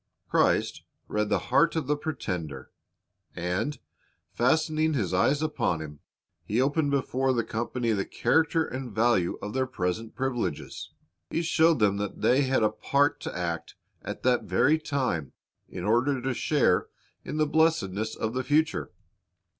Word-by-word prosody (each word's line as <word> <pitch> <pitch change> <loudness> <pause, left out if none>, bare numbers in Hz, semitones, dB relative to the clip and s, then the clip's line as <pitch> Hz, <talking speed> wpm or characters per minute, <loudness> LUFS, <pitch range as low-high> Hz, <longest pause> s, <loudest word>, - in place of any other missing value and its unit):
Christ - - +2 0.3
read 105 0 -1
the - - +3 0.2
heart 165 +6 +4
of 160 -3 -1
the 150 +3 +1
pretender, 90 - -5 0.6
and, 90 +12 -2 0.6
fastening 155 +4 +2
His 95 -8 -1
eyes 140 +11 +2
upon 150 - 0
him. 75 -2 -8 0.4
He 110 +4 -1
opened 145 +3 +2
before 135 -1 +1
the 120 -2 +1
company 115 +2 -2
the 100 -3 +1
character 160 0 +2
and 130 -3 -6
value 110 -4 +2
of 105 - -4
their 130 0 0
present 110 -1 -3
privileges. 130 -2 -3 0.4
He 165 - -1
showed 165 -1 +4
them 100 -3 +2
that 105 -1 -4
they 130 +3 +4
had 130 -4 +2
a 105 - +3
part 140 +6 +1
to - - -6
act 85 -2 -3 0.3
at - - -7
that 125 -1 +2
very 155 +2 +3
time, 130 - -2 0.4
in 90 - -6
order 120 +6 +2
to 130 +1 -2
share 130 -7 +2 0.4
in 150 - -5
the 155 - +3
blessedness 115 - +1
of 110 +1 -3
the 130 0 -1
future. 150 +3 +1
125 Hz, 155 wpm, -27 LUFS, 105-145 Hz, 0.6 s, heart